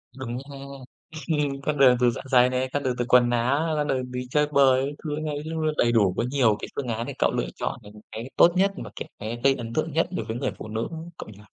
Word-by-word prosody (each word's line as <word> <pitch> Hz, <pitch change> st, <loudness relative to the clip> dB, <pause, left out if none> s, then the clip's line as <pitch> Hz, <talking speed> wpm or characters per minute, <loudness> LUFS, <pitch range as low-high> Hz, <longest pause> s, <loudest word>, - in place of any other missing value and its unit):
Đúng 125 Hz, -2 st, -5 dB
ha. -, -, -8 dB, 0.7 s
Ừm, 145 Hz, -3 st, -1 dB
con 150 Hz, +1 st, -1 dB
đường 130 Hz, -2 st, +6 dB
từ 125 Hz, -1 st, +4 dB
dạ -, -, -6 dB
dày 125 Hz, 0 st, +6 dB
này, 130 Hz, 0 st, -1 dB
con 145 Hz, -, -1 dB
đường 125 Hz, -2 st, 0 dB
từ 120 Hz, -, -1 dB
quần 125 Hz, -1 st, +6 dB
áo, 140 Hz, +7 st, +1 dB
ra 150 Hz, -, +1 dB
đường 130 Hz, -3 st, -2 dB
đi 125 Hz, 0 st, -4 dB
chơi 150 Hz, +2 st, +2 dB
bời 135 Hz, -1 st, +4 dB
các 145 Hz, -, -6 dB
thứ 150 Hz, -2 st, -2 dB
ấy 145 Hz, 0 st, -4 dB
luôn, 160 Hz, -1 st, -1 dB
đầy 120 Hz, -, +3 dB
đủ. 100 Hz, -6 st, +3 dB
Có -, -, +1 dB
nhiều 120 Hz, -7 st, +3 dB
cái -, -, -6 dB
phương 135 Hz, -3 st, -3 dB
án 115 Hz, 0 st, -2 dB
để -, -, -5 dB
cậu -, -, +3 dB
lựa -, -, -1 dB
chọn, -, -, -3 dB
ừm, 105 Hz, 0 st, -13 dB, 0.2 s
cái 115 Hz, +4 st, -6 dB
tốt 170 Hz, -, +7 dB
nhất 195 Hz, +2 st, +3 dB
và -, -, -8 dB
cái -, -, -7 dB
cái 115 Hz, +3 st, -5 dB
gây 135 Hz, 0 st, +5 dB
ấn 115 Hz, -1 st, -6 dB
tượng 155 Hz, +1 st, -1 dB
nhất 165 Hz, +1 st, +2 dB
đối 115 Hz, -, -3 dB
với 110 Hz, +1 st, -4 dB
người -, -, -1 dB
phụ -, -, -7 dB
nữ, 110 Hz, +1 st, -3 dB, 0.3 s
cậu -, -, -8 dB
nhỉ? 100 Hz, -, -13 dB
130 Hz, 270 wpm, -25 LUFS, 120-145 Hz, 0.7 s, tốt